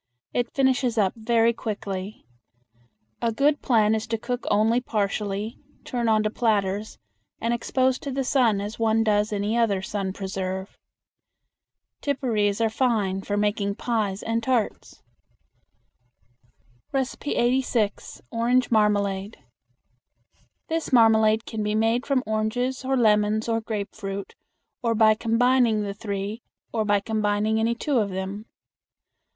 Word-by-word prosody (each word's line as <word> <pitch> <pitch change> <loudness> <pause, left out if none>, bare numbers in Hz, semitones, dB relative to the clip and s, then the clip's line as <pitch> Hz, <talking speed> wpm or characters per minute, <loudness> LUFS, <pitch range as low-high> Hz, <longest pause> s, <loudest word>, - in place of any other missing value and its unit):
It 245 0 -1
finishes 260 -3 +2
up 195 -3 +2
very 230 0 +2
quickly. 200 -2 -5 1.0
A 235 - +1
good 285 +6 +2
plan 220 -4 +3
is 220 0 -2
to 225 0 -1
cook 245 +2 -4
only 225 +4 +3
partially, 210 -1 -2 0.2
turn 240 -2 -1
onto 215 -1 +2
platters, 210 -2 0 0.4
and 230 +1 0
expose 260 +2 +1
to 280 - -6
the 270 0 -1
sun 250 -6 +2
as 210 +3 -6
one 225 0 +2
does 210 -1 +1
any 205 +2 -1
other 210 -5 +1
sun 195 -1 -3
preserve. 190 0 -4 1.3
Tipparees 230 -8 0
are 225 -1 +2
fine 215 -6 0
for 205 +1 -2
making 205 -1 0
pies 210 -5 -2
and 230 0 -1
tarts. 235 -2 -2 1.9
86. 250 -4 -1
Orange 245 +2 +1
Marmalade. 205 -2 +1 1.3
This 325 -1 -2
marmalade 220 -2 +5
can 220 -2 -4
be 210 0 -1
made 225 +3 +1
from 270 -3 +1
oranges 220 +5 -1
or 265 +1 0
lemons 215 -1 +3
or 225 -1 0
grapefruit, 200 -2 -5 0.5
or 230 -2 +1
by 215 0 +6
combining 230 0 +2
the 200 -1 -3
three, 200 +2 -4 0.3
or 220 -2 0
by 205 -1 +2
combining 215 0 0
any 230 +1 +1
two 275 +1 0
of 205 -2 0
them. 190 +3 -5
220 Hz, 125 wpm, -25 LUFS, 205-235 Hz, 1.9 s, by